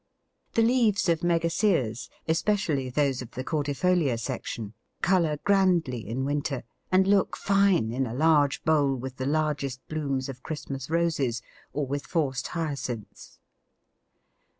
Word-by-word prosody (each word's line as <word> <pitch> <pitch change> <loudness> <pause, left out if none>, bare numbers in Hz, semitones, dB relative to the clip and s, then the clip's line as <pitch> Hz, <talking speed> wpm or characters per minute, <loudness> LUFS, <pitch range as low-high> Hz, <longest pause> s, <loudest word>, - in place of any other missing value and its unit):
The 230 - +3
leaves 225 -5 +3
of 165 -1 +3
Megaseas, 165 - +1 0.2
especially 160 -5 +1
those 135 -1 +1
of 125 - -8
the 130 - -6
cordifolia 145 -1 +1
section, 110 -1 -5 0.3
colour 170 -5 +3
grandly 180 - +2
in 125 +5 -2
winter, 145 -2 -2 0.3
and 185 +1 +5
look 195 0 +2
fine 195 - +3
in 130 +2 -1
a 115 - -5
large 150 -1 +3
bowl 145 -4 +3
with 130 +1 -6
the 130 - -2
largest 145 -4 -1
blooms 140 -4 -2
of 130 -2 -8
Christmas 140 -3 -5
Roses, 150 -8 0 0.3
or 145 -1 -1
with 140 +2 -4
forced 140 -7 -1
Hyacinths. 140 -9 -5
145 Hz, 130 wpm, -27 LUFS, 130-170 Hz, 0.3 s, and